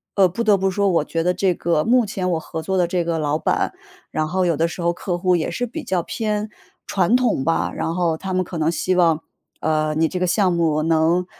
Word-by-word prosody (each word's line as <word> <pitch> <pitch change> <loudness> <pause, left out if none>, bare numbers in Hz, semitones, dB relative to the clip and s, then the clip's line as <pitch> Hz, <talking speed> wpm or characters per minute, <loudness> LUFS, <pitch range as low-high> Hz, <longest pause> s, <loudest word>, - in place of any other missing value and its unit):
呃， 195 - +5
不 185 +7 -4
得 215 -3 +4
不 195 0 0
说， 200 +2 +1
我 170 -5 +2
觉 165 +2 -2
得 180 +2 +1
这 185 0 +1
个 165 -2 0
目 245 0 +3
前 185 -2 -2
我 165 - 0
合 160 0 -6
作 190 +4 -1
的 180 -2 +2
这 175 0 0
个 165 -1 -1
老 150 0 0
板， - - 0 0.4
然 155 - -1
后 185 +4 0
有 170 -2 +2
的 165 +3 +1
时 175 - -7
候 170 0 +1
客 175 0 -3
户 180 0 +2
也 170 0 -1
是 245 +8 -2
比 295 +7 -7
较 185 -7 0
偏 210 +3 -2 0.4
传 190 +2 +1
统 240 - +1
吧， 165 - 0
然 165 - -2
后 170 -2 +1
他 190 +3 -5
们 185 - +2
可 175 -1 -7
能 160 0 +1
希 185 +2 0
望， 165 -3 +3 0.4
呃， 155 -1 +1
你 160 +1 +2
这 185 - -3
个 180 - +1
项 190 0 +2
目 160 -3 +1
能， 165 +2 +2
175 Hz, 270 characters per minute, -21 LUFS, 165-190 Hz, 0.4 s, 呃